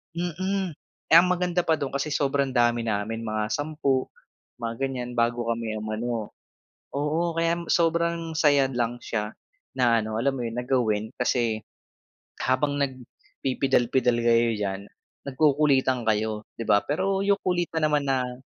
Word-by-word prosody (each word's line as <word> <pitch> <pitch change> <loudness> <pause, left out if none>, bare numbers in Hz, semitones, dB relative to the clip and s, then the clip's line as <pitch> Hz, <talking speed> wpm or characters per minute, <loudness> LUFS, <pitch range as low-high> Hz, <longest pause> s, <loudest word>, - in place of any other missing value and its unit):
mm, 185 +2 -2 0.4
eh, - - +8
ang 175 +2 +6
maganda 180 -1 +1
pa 160 - +3
do'n 140 -2 -3
kasi 140 +2 -1
sobrang 140 -1 +1
dami 120 -2 +2
namin 110 +2 -2
mga 110 -1 -1
sampu, 145 -2 0 0.5
mga 115 -1 -3
ganyan 125 -2 -5
bago 120 0 +1
kami 115 -1 -3
umano 110 +1 -3 0.6
oo 155 +4 0
kaya 165 +1 +1
sobrang 170 -1 +1
saya 145 -3 +4
lang 120 -1 -1
siya 105 -2 -2 0.5
na 120 -2 +4
ano 110 0 -3
alam 135 +3 +1
mo 125 - -3
yun 115 +1 -6
na 125 - -5
gawin 110 -5 +1
kasi 120 -3 +1 0.8
habang 140 +3 +1
nagpipidal 130 -1 -1
pidal 125 -2 +3
kayo 115 0 +3
diyan 100 -1 -3 0.5
nagkukulitan 135 -3 +3
kayo 110 0 0 0.2
di - - -2
ba, 100 - +5
pero 195 +6 0
yung 200 0 +3
kulitan 175 -3 0
naman 150 -1 +1
na. 125 -2 -1
130 Hz, 145 wpm, -26 LUFS, 115-155 Hz, 0.8 s, eh